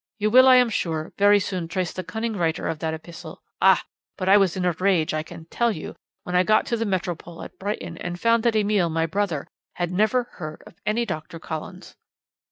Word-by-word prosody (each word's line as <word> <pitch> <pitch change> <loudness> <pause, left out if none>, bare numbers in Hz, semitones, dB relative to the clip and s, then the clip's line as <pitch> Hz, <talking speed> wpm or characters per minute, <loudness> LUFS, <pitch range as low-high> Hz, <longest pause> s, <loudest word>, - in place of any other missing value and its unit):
You 215 0 0
will, 255 +2 +8
I 260 - +8
am 250 -2 +4
sure, 160 -5 -2
very 205 0 +6
soon 185 -3 -3
trace 180 0 -2
the 185 - -5
cunning 220 +2 -3
writer 165 -3 -1
of 155 - -3
that 160 0 -2
epistle 170 +2 -11 0.2
ah! - - +5 0.3
but 185 - -3
I 195 - +7
was 195 -2 +3
in 180 - -1
a 180 - +3
rage, 175 -2 +1
I 155 - 0
can 165 0 -11
tell 235 -1 +1
you, 160 - -7 0.3
when 180 - -4
I 180 - +6
got 215 +3 +3
to 235 - -1
the 225 -1 -2
Metropole 175 -3 -3
at - - -12
Brighton, 205 +2 -4
and 175 0 -5
found 230 +2 +3
that 230 -1 +1
Emile, 205 -4 +2
my 165 0 0
brother, 170 -3 -2 0.3
had 175 -1 -2
never 215 +6 +2
heard 155 -9 -9
of - - -14
any 230 +3 +1
Doctor 165 -4 -6
Collins. 160 +3 -8
185 Hz, 220 wpm, -24 LUFS, 165-215 Hz, 0.3 s, will